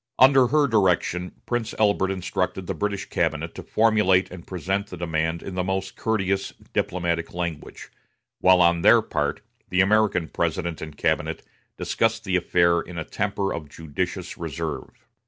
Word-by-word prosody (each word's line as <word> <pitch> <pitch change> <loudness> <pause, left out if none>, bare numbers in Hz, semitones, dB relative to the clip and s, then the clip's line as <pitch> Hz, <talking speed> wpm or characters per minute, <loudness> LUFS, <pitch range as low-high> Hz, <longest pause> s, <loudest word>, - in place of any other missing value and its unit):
Under 130 -1 +6
her 150 +3 +3
direction, 90 -6 +1
Prince 120 -2 -2
Albert 100 -3 +2
instructed 95 0 -2
the - - -2
British 100 -2 -2
cabinet - - -1
to - - -7
formulate 105 -4 +3
and 90 -2 -10
present 95 +3 -2
the 90 - -9
demand 80 -1 -1
in 95 - -6
the 90 0 -1
most 95 +1 -2
courteous 100 -3 -1 0.2
diplomatic 85 -2 -1
language, 85 -4 -5 0.5
while, 95 -1 +6
on 85 0 +3
their - - +6
part, - - -2 0.3
the 95 - 0
American 100 -3 +3
President 85 0 -2
and 80 -2 -8
cabinet - - -1 0.3
discussed 115 0 0
the 95 -2 -1
affair 85 -1 +3
in 85 0 -9
a 85 - -2
temper 100 -1 -2
of 75 -3 -6
judicious 75 -1 -4
reserve. - - -4
95 Hz, 155 wpm, -24 LUFS, 85-100 Hz, 0.5 s, Under